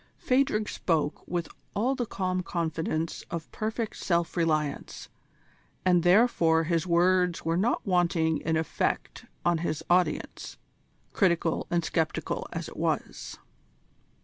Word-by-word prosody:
Phadrig 255 -5 +1
spoke 160 -3 -1
with 175 -1 -2 0.3
all 240 +6 +2
the 245 -3 -2
calm 185 -2 -1
confidence 165 -2 -2
of 165 -1 -5
perfect 220 +1 -3
self 170 -2 0
reliance, 155 -4 -1 0.8
and 180 -1 +5
therefore 175 -4 +4
his 165 +1 0
words 180 0 +3
were 165 0 +1
not 210 +7 +1
wanting 170 -4 +2
in 160 0 0
effect 160 -1 -2 0.2
on 175 -1 +3
his 160 -1 -2
audience, 180 0 0 0.6
critical 170 -4 +1
and 170 -1 +1
sceptical 160 -2 -1
as - - -4
it - - -11
was. - - -2
170 Hz, 120 wpm, -28 LUFS, 165-185 Hz, 0.8 s, and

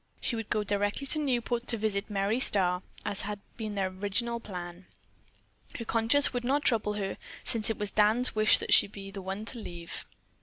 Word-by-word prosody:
She 240 - 0
would 225 -2 -5
go 215 - +1
directly 205 +5 -1
to 305 +3 +3
Newport 245 -3 -1
to 235 - +4
visit 210 -1 -1
Merry 205 +3 0
Starr, 180 -6 +2 0.2
as 200 - -1
had 205 0 -4 0.2
been 215 -3 -5
their 195 -1 0
original 205 +5 -1
plan. 180 -3 -8 0.9
Her 230 - -6
conscience 230 +6 +4
would 245 -1 -2
not 280 +4 +1
trouble 215 -4 +2
her, 195 -2 -3 0.3
since 225 -1 +2
it 225 - -1
was 210 -1 -2
Dan's 215 +4 +3
wish 215 0 +5
that - - +1
she - - +7
be 195 -1 -9
the 195 0 -7
one 190 +3 -5
to 235 +1 -1
leave. 170 -5 -6
210 Hz, 195 wpm, -29 LUFS, 195-235 Hz, 0.9 s, she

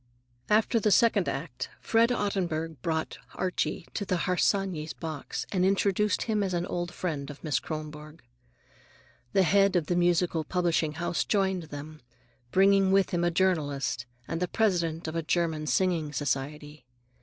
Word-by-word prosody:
After 220 +2 +3
the 215 - +2
second 230 +4 +4
act - - -4
Fred 230 +1 +3
Ottenburg 175 -8 -1
brought 160 +1 -2 0.2
Archie 185 -1 -2
to 205 - -2
the 180 -3 -1
Harsanyis' 180 -3 0
box 155 -4 -5
and 185 -2 +1
introduced 200 +1 +2
him 215 -2 0
as 190 -3 -1
an 175 0 -1
old 175 -1 -3
friend 150 -6 -4
of 145 - -10
Miss 150 -6 +1
Kronborg. 155 0 -7 1.1
The 195 - +5
head 195 +2 +4
of 170 -1 0
a - - +3
musical 175 -2 +2
publishing 170 -2 0
house 170 +2 -1
joined 190 -4 0
them, 150 0 -9 0.5
bringing 195 +3 +4
with 195 0 +3
him 175 -1 0
a 175 - +3
journalist 145 - 0 0.2
and 165 +1 -3
the 180 - +1
president 170 -6 0
of 160 - -4
a 165 - 0
German 160 -1 0
singing 170 -5 +1
society. 145 +1 -3
175 Hz, 155 wpm, -28 LUFS, 155-190 Hz, 1.1 s, The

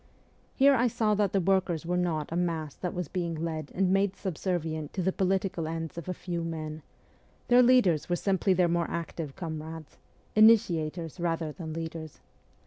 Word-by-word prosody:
Here 280 +1 +6
I 250 -1 +3
saw 220 -2 +1
that 205 -2 +1
the 195 - +2
workers 180 -3 +1
were 175 +1 -1
not 165 -4 -1
a - - -2
mass 165 -4 -1
that 180 - -5
was 180 -3 -3
being 170 0 -3
led 155 -2 -4
and 190 0 +2
made 195 0 +2
subservient 165 -5 -3
to 185 - -2
the 190 - +2
political 190 -3 0
ends 165 0 -4
of 170 +1 -7
a - - 0
few 170 -1 -4
men; 155 -1 -5 0.7
their 245 +1 +7
leaders 240 - +4
were 175 - +2
simply 190 +1 +1
their 180 -1 +3
more 170 0 0
active 165 -4 -5
comrades 160 -2 -7 0.4
initiators 175 -7 +3
rather 165 -2 -1
than 160 0 -7
leaders. 160 -1 -6
170 Hz, 175 wpm, -29 LUFS, 160-190 Hz, 0.7 s, their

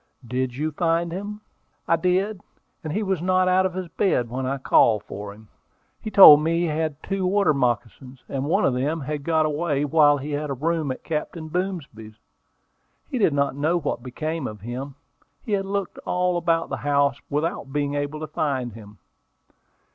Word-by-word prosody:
"Did 125 +1 -2
you 155 +4 -2
find 165 +2 0
him?" 205 +4 -6 0.5
"I 165 - +4
did; 185 +4 0 0.5
he 210 +8 -1
was 190 -4 -1
not 185 +1 +2
out 185 +1 +3
of 180 - -10
his 185 -1 -4
bed 165 - 0
when 130 +1 -3
I 135 +1 -1
called 115 -5 +3
for 100 0 -7
him. 110 +1 -15 0.5
He - - -5
told 155 -8 +10
me 165 +2 +1
he - - +1
had 155 -1 -2
two 195 0 -2
water 195 -3 +3
moccasins, 125 0 -2
and 135 0 -3
one 155 - +2
of 130 - +2
them 145 +6 -1
had 150 +1 -4
got 160 0 +2
away 150 -1 0
while 145 -1 +4
he 145 +2 -6
had 145 +1 -2
a 140 - -2
room 160 +2 -1
at 130 - -7
Captain 160 0 -4
Boomsby's. 155 - -4 1.0
He 255 - -1
did 165 -9 +3
not 140 -1 +1
know 155 +5 +1
what 145 -6 -3
became 155 +4 -4
of 105 -2 -9
him. 130 +5 -6 0.5
He 220 - -7
had 195 -1 0
looked 200 -1 -3
all 180 0 0
about 165 -1 0
the - - -3
house 140 -3 +1
without 145 -2 -2
being 145 0 -1
able 145 +1 -3
to 155 - -4
find 135 -6 -2
him." 105 -1 -13
150 Hz, 185 wpm, -24 LUFS, 135-175 Hz, 1.0 s, told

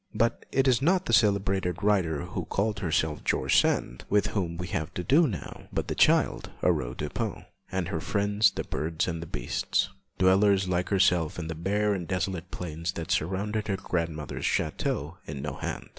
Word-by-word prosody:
But 115 0 0
it 135 0 +2
is 130 -1 +4
not 180 +5 +3
the - - -1
celebrated 95 -4 +2
writer 90 -7 +2
who 90 -1 -4
called 100 +4 -1
herself 80 -4 0
'George - - +1
Sand' - - -1
with 105 0 +3
whom 85 -5 -1
we 90 - -4
have 80 -2 -2
to 90 - -2
do 150 - +5
now, 100 -9 -6
but - - -2
the - - 0
child - - +3
Aurore 60 0 +1
Dupin, - - -3 0.3
and 95 -3 -1
her 80 - -2
friends 105 +2 +2
the - - -4
birds 80 +2 -2
and 85 -2 -4
beasts, - - 0 0.3
dwellers 95 +1 +4
like 90 0 0
herself 90 -5 +2
in 80 -2 -4
the - - -2
bare 100 +6 0
and 90 -4 -4
desolate 90 0 -2
plains 85 0 -4
that 80 -1 -5
surrounded 100 +6 -1
her 100 -2 0
grandmother's 80 -6 -3
château 75 +5 -1
of 75 - -5
Nohant. 70 0 -5
90 Hz, 175 wpm, -28 LUFS, 80-100 Hz, 0.3 s, do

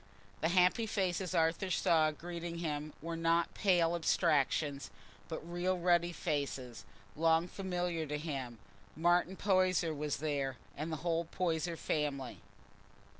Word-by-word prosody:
The 160 - +1
happy 185 +5 +3
faces 185 -3 -1
Arthur 165 +4 +2
saw 160 -3 +3
greeting 170 +2 -6
him 155 -2 -3
were 165 0 -3
not 165 +1 +1
pale 175 -4 +3
abstractions, 150 -4 +1 0.4
but 160 0 -6
real 175 +2 0
ruddy 175 0 +3
faces, 140 -6 -3 0.3
long 165 +2 +3
familiar 180 -4 -2
to 150 +1 -2
him: 135 -6 -4 0.4
Martin 175 +3 +2
Poyser 185 -4 +2
was 150 -1 -2
there—the 145 +1 -3
whole 170 +1 -1
Poyser 170 -1 -1
family. 140 -6 -2
165 Hz, 120 wpm, -34 LUFS, 150-175 Hz, 0.4 s, happy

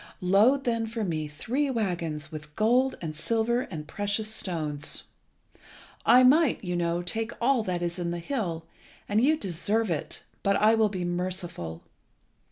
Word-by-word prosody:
Load 210 +10 +4
then 230 -2 0
for 225 0 -3
me 160 -5 -2
three 250 - -2
waggons 175 - -2
with 155 -1 -9
gold 250 +5 +2
and 155 -2 -4
silver 225 +8 +1
and 155 -4 -6
precious 205 +4 -1
stones. 155 -8 -2 1.0
I 250 +1 +8
might, 285 +1 +4
you 180 -1 -2
know, 170 0 0
take 225 +5 -2
all 255 0 +3
that 180 -1 -2
is 175 +1 -2
in 175 -1 -2
the 175 - -2
hill, 170 -5 -3 0.4
and 210 +3 +2
you 310 +3 +4
deserve 205 - -1
it; 155 - -3 0.2
but 200 0 +2
I 215 +2 +5
will 220 -1 +3
be 185 -3 -3
merciful. 175 - -3
195 Hz, 160 wpm, -27 LUFS, 170-230 Hz, 1.0 s, I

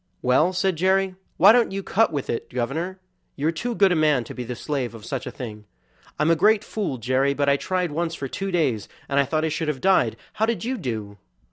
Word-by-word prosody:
"Well," 130 +8 +3
said 185 -1 0
Jerry, 190 +2 +2 0.2
"why 195 +5 +8
don't 235 -2 +3
you 195 0 -4
cut 225 +4 +2
with 145 -4 -3
it, 115 - -3
governor? 160 +10 -3 0.4
You 150 +3 0
are - - +1
too 235 +9 -3
good 195 -3 +4
a - - +3
man 150 -5 +3
to - - -9
be 125 - -5
the 125 +1 -5
slave 130 -2 -3
of 110 -1 -11
such 135 -1 -4
a - - -4
thing." 105 -4 -8 0.5
"I'm 150 +2 +3
a - - +5
great 210 +5 +4
fool, 200 -14 -3
Jerry, 130 +4 +1
but 140 0 0
I 140 - +5
tried 180 +3 -1
once 165 +2 -2
for 140 - -4
two 195 +8 -4
days, 145 - 0 0.2
and 140 0 +1
I 140 - +4
thought 155 +3 0
I - - 0
should 155 +1 -2
have 150 -3 -1
died; 190 +7 +3 0.2
how 220 - +1
did 230 -1 -1
you 255 0 -2
do?" 110 - -5
155 Hz, 245 wpm, -24 LUFS, 130-190 Hz, 0.5 s, why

